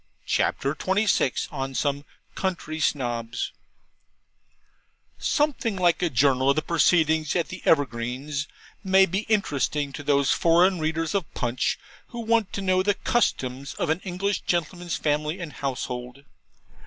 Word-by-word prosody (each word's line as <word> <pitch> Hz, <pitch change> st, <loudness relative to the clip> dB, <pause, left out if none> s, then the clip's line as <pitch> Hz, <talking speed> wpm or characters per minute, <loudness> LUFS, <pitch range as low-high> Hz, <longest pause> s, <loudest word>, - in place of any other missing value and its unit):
CHAPTER 140 Hz, +1 st, 0 dB
XXVI 190 Hz, -6 st, +1 dB
ON 135 Hz, -2 st, -4 dB
SOME 145 Hz, +1 st, -1 dB, 0.3 s
COUNTRY 170 Hz, -4 st, -3 dB
SNOBS 120 Hz, -6 st, -1 dB, 1.7 s
Something 285 Hz, -8 st, 0 dB
like 175 Hz, -2 st, +2 dB
a 175 Hz, -, +2 dB
journal 130 Hz, 0 st, +3 dB
of 140 Hz, -, +4 dB
the 155 Hz, -, 0 dB
proceedings 160 Hz, -2 st, +2 dB
at 170 Hz, -2 st, 0 dB
the 185 Hz, -, -7 dB
Evergreens 140 Hz, +1 st, 0 dB, 0.4 s
may 190 Hz, 0 st, +5 dB
be 190 Hz, +4 st, -3 dB
interesting 145 Hz, -, 0 dB
to 145 Hz, -, -6 dB
those 140 Hz, -1 st, +2 dB
foreign 175 Hz, +2 st, +4 dB
readers 160 Hz, +2 st, -1 dB
of 195 Hz, -6 st, -2 dB
PUNCH 120 Hz, +1 st, 0 dB, 0.3 s
who 235 Hz, -, -6 dB
want 225 Hz, -3 st, +1 dB
to 200 Hz, -, -3 dB
know 185 Hz, -1 st, +3 dB
the 205 Hz, +1 st, +1 dB
customs 135 Hz, -, -1 dB
of -, -, 0 dB
an 160 Hz, -, 0 dB
English 195 Hz, +2 st, -2 dB
gentleman's 175 Hz, 0 st, -2 dB
family 150 Hz, +3 st, -1 dB
and 170 Hz, -4 st, -6 dB
household. 125 Hz, -1 st, -5 dB
155 Hz, 135 wpm, -25 LUFS, 140-185 Hz, 1.7 s, may